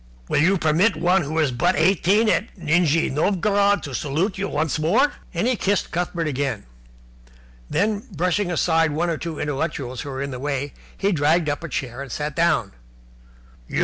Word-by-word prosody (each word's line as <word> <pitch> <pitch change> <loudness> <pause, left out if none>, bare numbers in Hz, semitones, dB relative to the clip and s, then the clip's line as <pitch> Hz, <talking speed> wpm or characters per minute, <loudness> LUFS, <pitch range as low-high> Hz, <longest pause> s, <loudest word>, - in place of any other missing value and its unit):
Will - - +2
you 190 +5 +4
permit 165 +7 +2
one 180 +2 +2
who 155 +1 -4
is 155 -4 +2
but 120 - +1
eighteen 190 +6 +3
at 215 +1 0
Nijni 165 -1 +2
Novgorod 200 +6 +2
to 140 - -6
salute 155 - -1
you 200 +1 -3
once 155 0 -1
more?" 220 - +2 0.2
And 175 +3 -1
he 250 +1 +2
kissed 200 -2 0
Cuthbert 175 -1 -2
again. 135 - -2 1.0
Then, 205 +4 0
brushing 180 +3 0
aside 165 -2 +2
one 170 +3 0
or 160 - -2
two 165 -2 -5
intellectuals 140 -4 -3
who 145 - -7
were 135 0 -4
in 140 - -4
the 125 - -6
way, 140 0 -3 0.2
he 200 +1 +1
dragged 155 0 +2
up 145 +3 -3
a 170 - -5
chair 130 -1 -4
and 140 -3 -7
sat 150 +2 -3
down. 155 -12 +2
165 Hz, 180 wpm, -22 LUFS, 145-190 Hz, 1.0 s, you